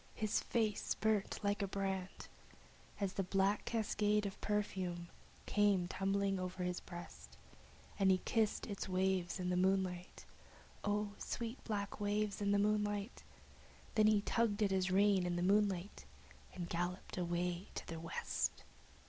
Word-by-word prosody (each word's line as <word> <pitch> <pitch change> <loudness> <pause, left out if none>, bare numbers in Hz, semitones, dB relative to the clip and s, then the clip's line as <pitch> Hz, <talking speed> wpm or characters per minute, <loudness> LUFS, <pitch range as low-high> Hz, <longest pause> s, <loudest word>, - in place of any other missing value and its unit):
His 215 -1 +1
face 220 -3 0
burnt 215 -2 +1
like 205 +1 +1
a 200 - 0
brand 190 -1 -3 0.7
As 200 -2 -1
the 195 - 0
sweet 185 - -6
black 195 +1 +2
waves 210 -2 +1
of 195 - -5
perfume 185 -4 -1 0.4
came 205 -4 +3
tumbling 195 +1 0
o'er 185 0 -3
his 180 0 -1
breast, 175 - -10 0.6
Then 195 -1 +5
he 190 - +6
kissed 220 -2 +1
its 200 -3 -4
waves 185 -1 +1
in 180 0 -1
the - - +2
moonlight 185 -1 0 0.6
(O 205 0 0
sweet 235 +2 -4
black 205 -2 -3
waves 205 0 0
in 200 - +1
the 200 - +4
moonlight!), 210 +1 0 0.7
And 215 -1 +6
he 210 -2 +4
tugged 220 -1 +1
at 200 - +2
his 190 -1 +2
reins 195 -1 +4
in 175 - 0
the 175 - 0
moonlight, 200 -1 +1 0.5
and 175 -2 -4
galloped 175 +2 -3
away 175 +1 -1
to - - -4
the 165 - -5
west. 165 0 -2
195 Hz, 150 wpm, -37 LUFS, 180-205 Hz, 0.7 s, he